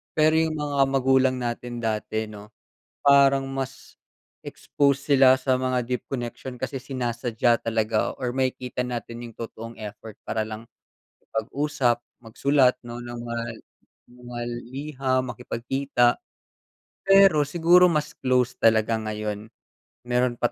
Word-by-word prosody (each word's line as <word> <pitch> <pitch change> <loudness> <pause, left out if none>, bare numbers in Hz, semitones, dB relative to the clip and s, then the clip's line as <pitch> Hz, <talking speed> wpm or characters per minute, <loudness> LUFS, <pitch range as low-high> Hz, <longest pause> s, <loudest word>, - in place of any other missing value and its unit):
Pero 155 0 +4
'yong 160 -1 0
mga 145 -1 -2
magulang 130 -1 +3
natin 120 0 -4
dati, 110 0 -2
'no, 105 0 -11 0.5
parang 140 -1 +5
mas, 135 -1 -6 0.5
expose 140 -1 0
sila 130 -1 +7
sa 130 -1 +2
mga 130 -1 0
deep 125 -1 -3
connection 125 0 -5
kasi 130 +1 -3
sinasadya 120 -2 0
talaga, 110 -1 0
or 125 - -1
makikita 125 -1 -2
natin 120 -1 -5
'yong 115 - -10
totoong 115 0 -7
effort 105 +1 -8
para 110 -1 -2
lang, 110 +2 -8 0.5
makipag-usap, 120 +1 -1 0.2
magsulat, 130 +3 +2
'no, 120 0 -7
ng 120 0 -7
pa 115 0 -4
mga 115 0 -3
li - - -20 0.6
mga 120 -1 -7 0.3
liham, 135 -3 -1
makipagkita. 120 +1 0 0.9
Pero 195 -5 +6
siguro 175 +4 +5
mas 150 -1 -1
close 125 -2 +2
talaga 110 0 +3
ngayon, 105 0 -4 0.6
meron 125 0 +1
pa 120 - +1
125 Hz, 130 wpm, -25 LUFS, 115-135 Hz, 0.9 s, sila